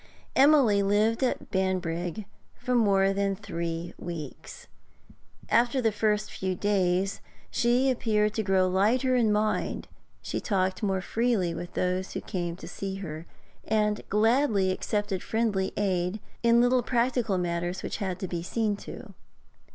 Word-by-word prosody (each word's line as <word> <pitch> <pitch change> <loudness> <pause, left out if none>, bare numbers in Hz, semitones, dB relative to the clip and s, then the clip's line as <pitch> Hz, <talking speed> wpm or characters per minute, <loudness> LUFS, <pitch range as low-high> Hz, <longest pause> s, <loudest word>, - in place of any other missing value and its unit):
Emily 265 -7 +5
lived 210 +4 +2
at 255 - -1
Banbrigg 185 0 -1 0.3
for 250 - -3
more 195 -4 +3
than 200 0 0
three 170 -3 -4
weeks. 165 -5 -8 0.8
After 240 +2 +3
the 225 -3 +2
first 210 0 0
few 190 -1 -2
days 190 -1 0 0.3
she 245 +3 +2
appeared 215 -4 +1
to 220 - 0
grow 190 -2 +2
lighter 230 +8 +2
in 230 -4 +3
mind; 215 +1 0 0.4
she - - -3
talked 190 -3 0
more 195 -3 0
freely 220 -4 0
with 175 +1 -7
those 185 +1 -1
who - - -3
came 175 -4 -3
to - - -10
see 195 -1 -5
her, 165 -4 -7 0.4
and 210 -1 +1
gladly 215 -2 +3
accepted 205 0 -2
friendly 215 -4 0
aid 185 0 0 0.2
in 235 0 +5
little 245 +1 +3
practical 240 -4 0
matters 175 +1 -2
which - - -3
had 190 -4 -3
to 190 - -2
be 170 -1 -3
seen 210 +4 -1
to. - - -10
200 Hz, 145 wpm, -27 LUFS, 185-225 Hz, 0.8 s, Emily